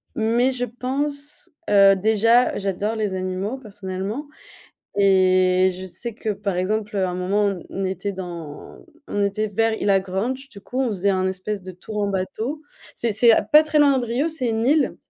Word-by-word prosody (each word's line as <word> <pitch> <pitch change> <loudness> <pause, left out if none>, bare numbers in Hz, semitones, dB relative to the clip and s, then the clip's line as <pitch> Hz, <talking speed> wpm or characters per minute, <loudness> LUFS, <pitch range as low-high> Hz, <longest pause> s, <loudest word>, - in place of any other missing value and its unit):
mais 235 +4 +2
je 245 -1 -2
pense 285 +7 -4 0.2
heu, 195 -1 +6
déjà 220 +5 +3
j'adore 200 +2 -2
les 210 -3 -2
animaux 185 +5 -3
personnellement 205 +3 -6 0.7
et 185 -1 +4
je 185 - -6
sais 190 +6 -4
que 220 -1 -3
par 200 -2 -3
exemple, 210 +3 -1
heu, 190 - +2
à 185 - -1
un - - -4
moment 185 +3 0
on 195 -3 -2
on 195 - -3
était 190 +2 -3
dans 170 -5 -8 0.3
on 205 - -1
était 200 +2 0
vers 225 +2 +1
Ilha 195 -1 +3
Granche 225 +9 -3
du 200 - -13
coup. 255 +6 -4
On 260 - +1
faisait 200 -1 0
un 185 -1 +1
espèce 190 +1 -3
de 185 - -8
tour 210 +4 -8
en 200 - 0
bateau 220 +10 -3 0.3
c'est 230 -2 -1
c'est 230 +2 +6 0.2
pas 300 +1 +9
très 305 0 0
loin 285 -2 +5
de 245 - -2
Rio. 255 +8 0
C'est 310 -6 -2
une 225 +1 0
île, 295 +1 +2
205 Hz, 190 wpm, -22 LUFS, 190-245 Hz, 0.7 s, pas